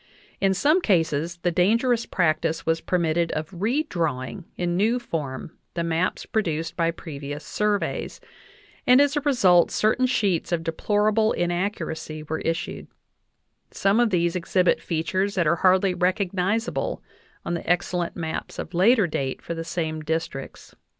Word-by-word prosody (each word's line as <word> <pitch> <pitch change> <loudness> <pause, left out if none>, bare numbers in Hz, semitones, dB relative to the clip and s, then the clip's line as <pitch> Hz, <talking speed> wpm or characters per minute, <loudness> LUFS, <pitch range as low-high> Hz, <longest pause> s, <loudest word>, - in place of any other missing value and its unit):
In 195 -1 +2
some 305 - +3
cases 165 - +1
the 175 - +2
dangerous 230 +7 +2
practice 160 -2 0
was 165 0 +1
permitted 170 -1 0
of 155 +2 -4
redrawing 180 - -2
in 175 -1 -1
new 220 +6 +2
form 155 - -5 0.2
the 170 - -1
maps 165 +2 -1
produced 165 -7 -2
by 165 -1 +1
previous 145 -3 -7
surveys, 210 -1 -1 0.7
and 250 +1 +7
as 285 0 +3
a 295 - +1
result 195 - +4
certain, 235 +4 +2
sheets 200 -10 0
of 170 -2 0
deplorable 210 +6 +1
inaccuracy 175 -3 -2
were 160 +1 -3
issued; 165 0 -3 0.8
some 200 +3 +1
of 240 -1 +4
these 170 -3 +1
exhibit 180 0 +2
features 185 +4 -1
that 175 -3 +2
are 170 +3 +3
hardly 185 +1 +3
recognizable 185 +4 -1 0.4
on 170 - -2
the 170 - -4
excellent 175 -1 0
maps 160 -2 -5
of - - -6
later 205 +5 +4
date 135 -5 -3
for 170 - -5
the 165 0 -4
same 160 -1 -3
districts. 155 -3 -4
175 Hz, 145 wpm, -24 LUFS, 165-205 Hz, 0.8 s, and